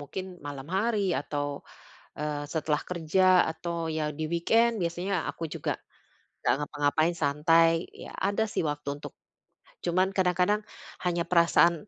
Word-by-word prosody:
mungkin 185 Hz, +6 st, -5 dB, 0.2 s
malam 145 Hz, 0 st, -7 dB
hari 215 Hz, +1 st, +1 dB, 0.2 s
atau, 145 Hz, -1 st, -4 dB, 0.5 s
eee, 145 Hz, -1 st, -3 dB
setelah 150 Hz, -1 st, 0 dB
kerja, 170 Hz, 0 st, 0 dB, 0.3 s
atau 170 Hz, +1 st, -5 dB, 0.2 s
ya 155 Hz, -, 0 dB, 0.2 s
di 155 Hz, -, -1 dB
weekend 225 Hz, +8 st, +3 dB
biasanya 175 Hz, +3 st, -1 dB
aku 165 Hz, -, -4 dB
juga -, -, -2 dB, 0.7 s
enggak -, -, +2 dB
ngapa-ngapain, 150 Hz, +3 st, +1 dB
santai. 165 Hz, +3 st, +4 dB, 0.2 s
Ya, -, -, -10 dB, 0.2 s
ada 205 Hz, +2 st, +1 dB
sih -, -, 0 dB
waktu 145 Hz, -1 st, -5 dB, 0.2 s
untuk -, -, -7 dB, 0.7 s
cuman 185 Hz, +2 st, +2 dB
kadang-kadang 185 Hz, +2 st, +2 dB, 0.5 s
hanya 175 Hz, -1 st, +1 dB
perasaan, 170 Hz, +1 st, +4 dB
170 Hz, 130 wpm, -28 LUFS, 150-180 Hz, 0.7 s, santai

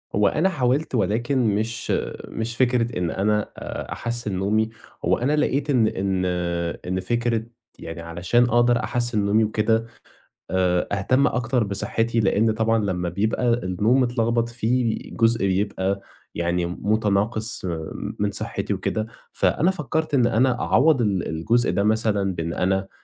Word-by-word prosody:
هو 105 Hz, -1 st, +4 dB
أنا 165 Hz, -, +2 dB
حاولت 135 Hz, -2 st, 0 dB
ولكن 115 Hz, +2 st, +1 dB
مش 110 Hz, +2 st, -2 dB, 0.4 s
مش 115 Hz, +1 st, -4 dB
فكرة 120 Hz, -2 st, +1 dB
إن 90 Hz, -2 st, -1 dB
أنا 105 Hz, +2 st, 0 dB
آآ -, -, -6 dB
أحسِّن 120 Hz, -3 st, -3 dB
نومي، 110 Hz, +4 st, +1 dB, 0.4 s
هو -, -, +3 dB
أنا 140 Hz, +5 st, +1 dB
لقيت 145 Hz, -1 st, 0 dB
إن 120 Hz, -6 st, +4 dB
إن 95 Hz, -2 st, -1 dB, 0.6 s
إن 95 Hz, +1 st, -1 dB
فكرة 115 Hz, +3 st, 0 dB, 0.4 s
يعني 80 Hz, 0 st, -7 dB
علشان 85 Hz, +8 st, +1 dB
أقدر 120 Hz, 0 st, +3 dB
أحسِّن 120 Hz, -3 st, 0 dB
نومي 110 Hz, +2 st, +3 dB
وكده، 110 Hz, +1 st, +1 dB, 0.7 s
آآ 90 Hz, -1 st, +1 dB
أهتم 130 Hz, +8 st, +2 dB
أكتر 125 Hz, -1 st, 0 dB
بصحِّتي، 115 Hz, +3 st, 0 dB
لإن 110 Hz, +2 st, +2 dB
طبعًا 115 Hz, +1 st, +1 dB
لمّا 90 Hz, -2 st, -1 dB
بيبقى 110 Hz, +7 st, 0 dB
النوم 110 Hz, +4 st, +1 dB
متلخبط 120 Hz, -1 st, +1 dB
في 120 Hz, 0 st, 0 dB, 0.2 s
جزء 115 Hz, -3 st, +2 dB
بيبقى 95 Hz, 0 st, 0 dB, 0.3 s
يعني 85 Hz, 0 st, 0 dB
متناقص 105 Hz, +4 st, 0 dB
م 80 Hz, -3 st, -3 dB, 0.3 s
من 105 Hz, 0 st, 0 dB
صحّتي 105 Hz, -1 st, -3 dB
وكده. 110 Hz, +3 st, -2 dB, 0.3 s
فأنا 175 Hz, +4 st, +2 dB
فكّرت 155 Hz, -3 st, -2 dB
إن 125 Hz, -3 st, +4 dB
أنا 125 Hz, +2 st, +2 dB
أعوّض 145 Hz, -1 st, +3 dB
ال 100 Hz, -5 st, 0 dB
الجزء 115 Hz, +10 st, +1 dB
ده 95 Hz, +3 st, 0 dB
مثلًا 105 Hz, -3 st, +1 dB
بإن 85 Hz, 0 st, -3 dB
أنا 95 Hz, +1 st, 0 dB
110 Hz, 145 wpm, -23 LUFS, 95-120 Hz, 0.7 s, هو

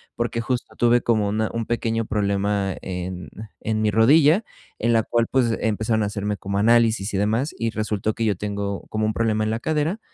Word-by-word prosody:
porque 120 Hz, 0 st, -2 dB
justo, 125 Hz, +1 st, -3 dB
tuve 120 Hz, 0 st, +3 dB
como 110 Hz, -4 st, +1 dB
una 110 Hz, +1 st, 0 dB
un 115 Hz, -1 st, -2 dB
pequeño 115 Hz, -1 st, -1 dB
problema 100 Hz, -2 st, 0 dB
en 90 Hz, -3 st, -5 dB, 0.3 s
en 110 Hz, 0 st, -1 dB
mi 105 Hz, -1 st, +2 dB
rodilla, 145 Hz, -, +5 dB, 0.3 s
en 115 Hz, +2 st, +1 dB
la 115 Hz, -1 st, +3 dB
cual, 115 Hz, +1 st, 0 dB
pues, 120 Hz, -4 st, +2 dB
empezaron 110 Hz, 0 st, 0 dB
a -, -, 0 dB
hacerme 105 Hz, 0 st, -2 dB
como 100 Hz, +1 st, -3 dB
análisis 110 Hz, -2 st, +3 dB
y -, -, 0 dB
demás, 110 Hz, +9 st, 0 dB
y 115 Hz, -, -1 dB
resultó 110 Hz, -1 st, -2 dB
que 115 Hz, -, -2 dB
yo 105 Hz, -2 st, +1 dB
tengo 100 Hz, 0 st, -3 dB
como 110 Hz, 0 st, -1 dB
un 110 Hz, -, 0 dB
problema 110 Hz, -1 st, 0 dB
en 110 Hz, -, -1 dB
la 115 Hz, -, -1 dB
cadera. 155 Hz, +7 st, -1 dB
110 Hz, 200 wpm, -23 LUFS, 105-115 Hz, 0.3 s, rodilla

